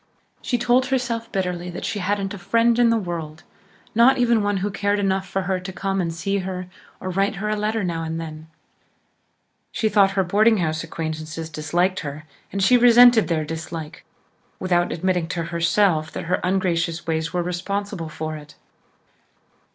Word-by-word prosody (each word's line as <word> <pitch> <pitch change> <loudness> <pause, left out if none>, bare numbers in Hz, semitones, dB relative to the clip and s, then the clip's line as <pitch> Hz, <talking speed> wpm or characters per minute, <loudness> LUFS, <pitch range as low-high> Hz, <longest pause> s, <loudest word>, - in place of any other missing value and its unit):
She 245 - 0
told 245 +2 +2
herself 235 -3 -2
bitterly 180 -2 -2
that 175 - -6
she 215 -2 -2
hadn't 195 +1 -1
a 200 - -7
friend 230 +5 +2
in 240 -1 +5
the 230 - +3
world 165 -5 -5 0.5
not 235 +4 +5
even 235 -3 +3
one 205 -1 0
who 205 - -2
cared 200 +1 0
enough 190 -1 0
for 190 +1 -1
her 185 0 -1
to 185 +1 -7
come 195 +1 -2
and 170 -2 -2
see 195 +5 -2
her 185 -1 -4 0.3
or 185 - -4
write 195 +3 0
her 210 +2 -3
a 215 - +1
letter 215 +1 -1
now 170 -2 -2
and 165 0 -3
then. 155 -1 -8 1.2
She 220 - 0
thought 200 -2 +4
her 190 - +4
boarding 215 +5 +3
house 160 -3 -1
acquaintances 160 0 -5
disliked 175 +5 0
her 145 +1 -7 0.3
and 195 -1 -1
she 250 +6 +6
resented 240 -1 +7
their 160 -3 0
dislike, 160 0 -6 0.6
without 175 -1 +1
admitting 180 0 0
to 170 -1 -3
herself 170 0 +1
that - - -4
her 180 +2 0
ungracious 175 -2 0
ways 160 0 -1
were 180 -1 -1
responsible 180 0 -3
for 155 0 -5
it. 150 -1 -12
185 Hz, 175 wpm, -22 LUFS, 165-205 Hz, 1.2 s, resented